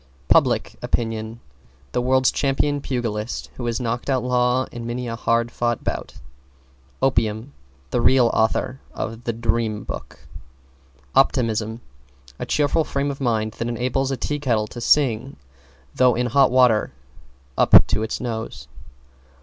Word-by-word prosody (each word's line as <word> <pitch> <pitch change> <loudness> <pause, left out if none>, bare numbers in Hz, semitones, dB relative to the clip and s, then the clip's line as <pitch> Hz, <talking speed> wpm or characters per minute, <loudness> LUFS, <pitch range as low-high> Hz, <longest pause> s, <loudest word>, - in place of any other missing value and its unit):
=PUBLIC - - +3
OPINION= 115 0 -2 0.5
The - - 0
world's 130 +1 +3
champion 145 +1 0
pugilist, 115 -4 -3
who 120 - -4
has 115 -1 -1
knocked 120 +2 -3
out 130 -2 +1
Law 125 +1 +2
in 115 -1 -7
many 120 +1 -4
a 115 - -3
hard 115 +1 0
fought 120 -1 -1
bout. - - -4 0.9
=OPIUM= 115 -1 0 0.4
The 120 - +1
real 125 -1 +4
author 125 +4 0 0.2
of 115 +2 -5
"The 115 - 0
Dream 110 -2 -1
Book." - - -9 0.9
=OPTIMISM= 115 -4 +1 0.6
A - - -4
cheerful 150 +2 +2
frame 140 -1 -2
of 140 - -8
mind 110 -4 0
that 115 - -1
enables 125 +3 -1
a 135 - -2
tea 145 +3 -2
kettle 115 -7 +1
to 120 - -8
sing 135 -1 +2 0.6
though 125 -2 +4
in 125 - 0
hot 135 +2 +4
water 125 - +3 0.6
up - - +7
to 110 -1 0
its 110 - -3
nose. 115 -3 -5
120 Hz, 140 wpm, -22 LUFS, 115-130 Hz, 0.9 s, up